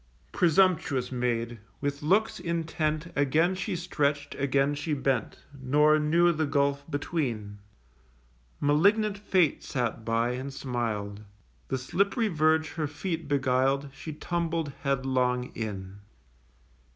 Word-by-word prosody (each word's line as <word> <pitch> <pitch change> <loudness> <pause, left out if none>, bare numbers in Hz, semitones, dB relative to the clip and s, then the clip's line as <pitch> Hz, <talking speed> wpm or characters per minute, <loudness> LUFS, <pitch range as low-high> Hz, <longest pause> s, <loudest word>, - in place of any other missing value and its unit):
Presumptuous 170 -6 +2
Maid! 120 -2 -1 0.2
with 140 0 -2
looks 195 +9 +2
intent 165 -1 -2
Again 155 +6 +3
she 185 -1 -3
stretch'd, 145 -4 -1
again 140 +1 +1
she 150 +1 -2
bent, 135 -4 -1 0.2
Nor 150 +4 +4
knew 170 +3 +4
the 155 -2 -1
gulf 140 +1 0
between. 125 - -3 1.0
(Malignant 200 +9 +3
Fate 190 -6 +1
sat 120 -3 -2
by, 115 +1 +1
and 130 +3 -4
smiled.) 110 -6 -3 0.5
The 130 - -1
slipp'ry 200 - 0
verge 155 -1 +2
her 155 -3 -3
feet 160 +2 -4
beguiled, 135 0 +1
She 155 +3 -7
tumbled 165 -1 -2
headlong 130 -2 0
in. 100 -3 -6
145 Hz, 115 wpm, -28 LUFS, 125-165 Hz, 1.0 s, Nor